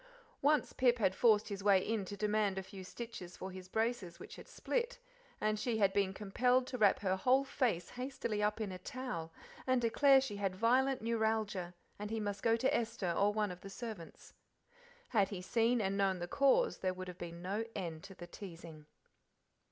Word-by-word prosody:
Once 295 0 +2
Pip 245 -1 +3
had 200 -5 +2
forced 215 0 +4
his 200 -1 -5
way 195 -2 +4
into 205 -3 -2
demand 210 -1 +1
a 190 - -2
few 190 0 -10
stitches 185 -3 -8
for 190 - -6
his 185 0 -9
braces 220 -5 -1
which - - -10
had - - -12
split, - - -2 0.4
and 215 0 0
she 230 0 0
had 200 -3 +3
been 200 -1 +2
compelled 245 +6 +1
to 255 - -6
wrap 205 -2 +4
her 190 -2 +1
whole 255 +7 +3
face 235 - -1
hastily 250 -4 -3
up 210 +1 +1
in 210 -3 -2
a 185 - -7
towel 185 -7 -5 0.4
and 255 -1 +3
declare 270 +4 +5
she 260 -6 -4
had 195 -2 -1
violent 255 +5 +2
neuralgia, 220 -5 -1 0.2
and 210 0 -4
he 225 0 -2
must 205 -2 -3
go 230 -1 +3
to 260 +3 +1
Esther 225 -6 -1
or 205 +1 +3
one 210 -2 0
of 180 - -9
the 195 - -9
servants. 210 -5 -8 0.8
Had 200 -5 +3
he 195 - -5
seen 230 +6 +2
and 195 -2 0
known 195 -2 +2
the 175 0 -4
cause 280 - +3
there 185 -1 -1
would 185 0 -6
have 180 -1 -9
been 170 0 -7
no 200 +4 -1
end 165 -5 -4
to 195 - -11
the 175 - -9
teasing. 165 -4 -10
210 Hz, 200 wpm, -35 LUFS, 190-235 Hz, 0.8 s, declare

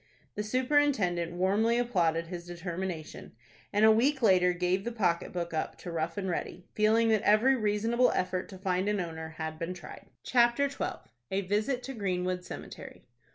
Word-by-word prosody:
The 210 - -3
superintendent 235 - +1
warmly 205 +6 +2
applauded 170 -9 +1
his 175 0 -7
determination, 175 -1 -6 0.4
and 210 +2 +4
a 220 - +8
week 265 +4 +2
later 185 -4 +5
gave 180 +2 0
the 235 - -3
pocket 180 -7 0
book 170 -1 -4
up 160 - -2
to 175 - -7
Rough 165 +1 -3
and 195 -1 -2
Ready, 180 0 -4
feeling 220 +2 +3
that 220 -2 +3
every 220 +6 +4
reasonable 225 +2 +2
effort 185 0 -1
to 190 - -9
find 185 +1 0
an 210 -1 0
owner 160 -2 -5
had 160 0 -5
been 170 +2 -3
tried. - - -11 0.2
CHAPTER 240 +3 +3
XII. 275 - -5 0.2
A 195 - 0
VISIT 215 +7 -1
TO 270 - -6
GREENWOOD 185 -4 -2
CEMETERY. 185 - -9
190 Hz, 170 wpm, -30 LUFS, 175-225 Hz, 0.4 s, a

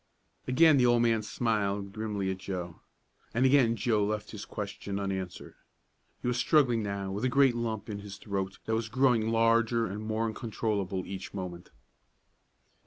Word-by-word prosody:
Again 155 +3 +6
the 125 - +4
old 120 -1 +4
man 115 -2 +3
smiled 105 -3 -1
grimly 105 -3 -2
at 95 - -5
Joe, 90 -3 -5 0.6
and 125 +3 +3
again 130 -4 +5
Joe 110 -1 +1
left 105 0 -2
his 105 -2 -7
question 100 -1 -5
unanswered. 95 -2 -4 0.7
He - - -1
was 125 0 +1
struggling 125 -7 +3
now 100 -2 -3
with 100 +4 -4
a 130 - +2
great 135 0 +4
lump 110 -3 -3
in 105 -2 -5
his 100 -1 -9
throat 100 -2 -3
that 110 - -1
was 110 0 -1
growing 120 -2 +3
larger 115 0 +3
and 105 0 -5
more 110 +1 -1
uncontrollable 105 -4 -2
each 95 +1 -7
moment. 90 -2 -6
110 Hz, 165 wpm, -29 LUFS, 100-115 Hz, 0.7 s, Again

